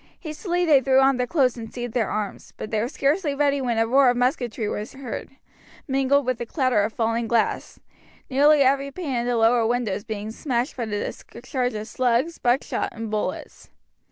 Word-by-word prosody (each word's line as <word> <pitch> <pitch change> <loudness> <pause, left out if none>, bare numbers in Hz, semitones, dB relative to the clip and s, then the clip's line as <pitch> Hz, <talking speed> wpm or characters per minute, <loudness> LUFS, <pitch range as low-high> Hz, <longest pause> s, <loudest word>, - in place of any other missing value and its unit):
Hastily 350 +2 -2
they 295 -5 +5
threw 265 0 +4
on 270 -1 +4
their 250 0 -1
clothes 260 -6 +2
and 225 -1 -8
seized 240 -2 -5
their 235 -3 0
arms; 210 -2 -4
but - - -7
they 220 - +1
were 235 - -1
scarcely 290 +3 0
ready 285 -1 +1
when 240 -3 -1
a 225 - +3
roar 260 +3 +4
of 245 - +1
musketry 245 -3 -1
was 210 +1 -4
heard, 265 -3 -6 0.6
mingled 270 0 +2
with 255 -2 -1
a - - -2
clatter 255 -7 +1
of 210 +2 -1
falling 230 0 -1
glass, 230 -1 -1 0.5
nearly 285 +2 +5
every 275 +1 +2
pane 290 -1 -5
in 240 0 -1
the 245 -1 +1
lower 230 +1 +4
windows 220 -5 -1
being 215 -1 -5
smashed 250 +2 -2
by 240 - -3
the 210 -1 -3 0.4
discharge 250 0 -3
of 215 0 -5
slugs, 250 +7 0
buckshot 245 +2 0
and 225 -2 -6
bullets. 215 -1 -4
245 Hz, 195 wpm, -24 LUFS, 225-275 Hz, 0.6 s, they